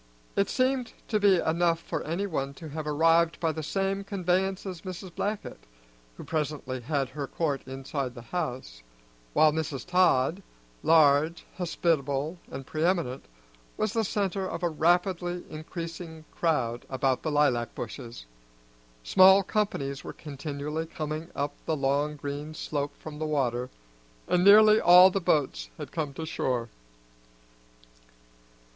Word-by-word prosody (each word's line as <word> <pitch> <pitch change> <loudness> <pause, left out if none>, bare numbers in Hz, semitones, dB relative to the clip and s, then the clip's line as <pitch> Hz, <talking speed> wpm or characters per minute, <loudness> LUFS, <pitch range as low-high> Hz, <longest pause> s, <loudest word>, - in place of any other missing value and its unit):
It 200 - +2
seemed 255 -2 0 0.2
to 215 - +2
be 200 -2 +5
enough 165 0 +1
for - - -4
anyone 160 -5 -2
to 160 +2 -9
have 155 +1 -5
arrived 165 +2 +3
by 165 -2 +1
the 155 - -5
same 195 +5 -1
conveyance 190 0 -1
as 185 -4 -6
Mrs. 185 -1 -7
Blackett, 205 - -4 0.5
who - - -8
presently 150 -4 -3
had 140 +1 -1
her 140 +1 -5
court 145 -4 -1
inside 135 -1 -4
the 120 - -9
house, 125 - -4 0.5
while 155 - +5
Mrs. 150 -3 -3
Todd, 180 -2 +3 0.4
large, 155 +1 +4
hospitable, 160 -2 0
and 135 0 -7
preeminent, 155 -4 -1 0.5
was 215 -1 0
the 225 - +1
centre 195 -2 -1
of 170 - -5
a 175 - +2
rapidly 175 +2 +1
increasing 165 0 -7
crowd 125 -8 0
about 130 -1 0
the 155 - -2
lilac 145 -6 +1
bushes. 115 - -7 0.8
Small 190 - +7
companies 155 -10 -2
were - - -7
continually 150 +1 -5
coming 155 +1 -5
up 145 +1 -2
the 160 - 0
long 140 +2 0
green 145 +2 -6
slope 145 -1 -3
from 150 -1 -9
the 155 - -2
water, 125 -4 0 0.6
and 180 0 +2
nearly 215 +2 +8
all 180 +2 +8
the 195 - -1
boats 130 - 0
had - - -7
come 155 -4 -2
to 160 - -5
shore. 125 -6 -2
160 Hz, 140 wpm, -28 LUFS, 140-180 Hz, 0.8 s, nearly